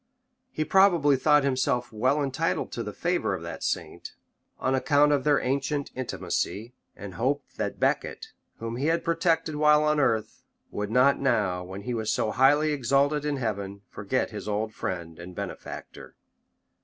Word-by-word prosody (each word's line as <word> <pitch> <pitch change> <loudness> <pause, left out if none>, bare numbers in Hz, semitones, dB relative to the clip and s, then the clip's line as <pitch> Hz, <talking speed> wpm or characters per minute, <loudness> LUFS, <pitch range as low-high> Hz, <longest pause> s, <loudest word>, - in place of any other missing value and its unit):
He 155 - -2
probably 170 -5 +4
thought 150 +2 +4
himself 130 -3 0
well 130 +7 +1
entitled 135 -1 -1
to - - -4
the - - -4
favor - - -1
of - - -8
that - - -7
saint, - - -4 0.4
on 130 - 0
account 145 +3 +3
of 140 -2 +2
their 145 -1 +3
ancient 140 +2 -1
intimacy; 120 -2 -3 0.2
and 100 -2 -8
hoped 130 +9 -2
that - - -3
Becket, - - -1 0.3
whom 115 +1 -5
he 140 +4 -1
had 165 +1 +1
protected 165 -2 +1
while 150 0 +5
on 150 0 +2
earth, 110 -6 0 0.3
would 105 0 -3
not 130 +4 +4
now, 105 -9 +1
when 95 +2 -8
he 125 - -3
was 110 -2 -1
so 110 - 0
highly 145 +5 +4
exalted 140 +2 +1
in 145 -1 -1
heaven, 100 -4 -4
forget - - -2
his - - -7
old 105 +1 -2
friend 85 -5 -5
and 90 +1 -9
benefactor. - - -8
135 Hz, 165 wpm, -27 LUFS, 110-150 Hz, 0.4 s, while